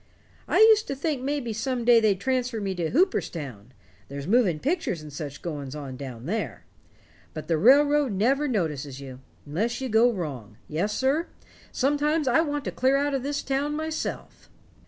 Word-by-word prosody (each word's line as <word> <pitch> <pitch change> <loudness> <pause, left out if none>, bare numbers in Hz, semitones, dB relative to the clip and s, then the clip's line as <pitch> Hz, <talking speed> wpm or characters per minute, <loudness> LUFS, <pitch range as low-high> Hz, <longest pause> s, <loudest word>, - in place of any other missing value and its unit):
I - - +1
used 440 0 +6
to 275 - -3
think 280 -1 -2
maybe 270 -4 -2
some 240 +2 -2
day 240 -1 +7
they'd 210 -4 +2
transfer 250 -1 -1
me 195 -2 -2
down 175 -3 -2
to - - -6
Hooperstown 145 - -1 0.4
there's 140 0 -6
moving 205 -5 +3
pictures 270 - -2
and 150 -2 -10
such 145 -2 -7
goings 145 -5 -5
on 140 -3 -6
down 125 -3 -8
there. 215 +7 -3 0.7
But 155 - -6
the 165 - +2
railroad 285 - +5
never 265 +9 +2
notices 150 - -2
you 130 -2 -9 0.3
unless 210 +12 -2
you 265 -1 -3
go 230 +2 +5
wrong. 135 - -6
Yes, 170 +7 -1
sir, 280 +6 +1 0.4
sometimes 295 +2 +1
I 255 +6 +4
want 290 -3 -2
to - - -2
clear 265 +2 +2
out 285 0 0
of 270 - 0
this 285 +2 -3
town 280 +2 -1
myself." 315 +1 -5
235 Hz, 180 wpm, -26 LUFS, -, 0.7 s, day